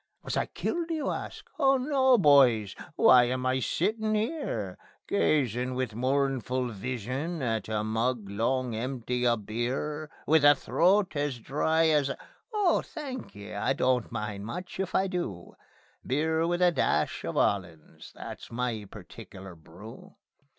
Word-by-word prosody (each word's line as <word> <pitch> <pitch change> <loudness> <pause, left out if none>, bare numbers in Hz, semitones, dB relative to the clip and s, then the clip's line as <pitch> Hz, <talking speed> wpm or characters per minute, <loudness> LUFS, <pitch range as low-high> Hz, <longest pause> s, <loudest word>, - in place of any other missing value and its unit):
Was - - -3
I - - 0
killed, 340 -1 -3
do 330 - -2
you 300 -3 -2
ask? - - -6
Oh 270 -2 +4
no, 265 -1 +3
boys. 130 - +5 0.2
Why 125 -1 +7
am 125 +1 -2
I 130 0 +1
sittin' 215 - 0
'ere 210 - -3 0.3
Gazin' 125 - +1
with 130 -3 -2
mournful 130 0 0
vision 130 - -4
at 110 -3 -2
a 105 -1 -1
mug 115 0 -1
long 120 +5 -1
empty 125 +1 -2
of 115 -4 0
beer? 135 +7 -3 0.2
With 155 0 +4
a 145 0 +8
throat 190 +5 +2
as 145 -3 -1
dry 160 +6 +1
as 145 -3 +2
a - - -4 0.3
oh, 415 -5 +2
thanky! 255 - -8
I 100 +6 0
don't 125 -3 +1
much 105 -3 -4
mind 180 +9 -5
if 190 -1 -2
I 190 - +3
do. 170 - -4 0.5
Beer 160 +4 0
with 175 +1 +1
a 180 - +5
dash - - 0
of - - -4
'ollands, 85 -6 -2
that's - - -9
my 115 -3 -3
particular 95 -1 -11
brew. 90 +8 -13
130 Hz, 150 wpm, -28 LUFS, 115-165 Hz, 0.5 s, a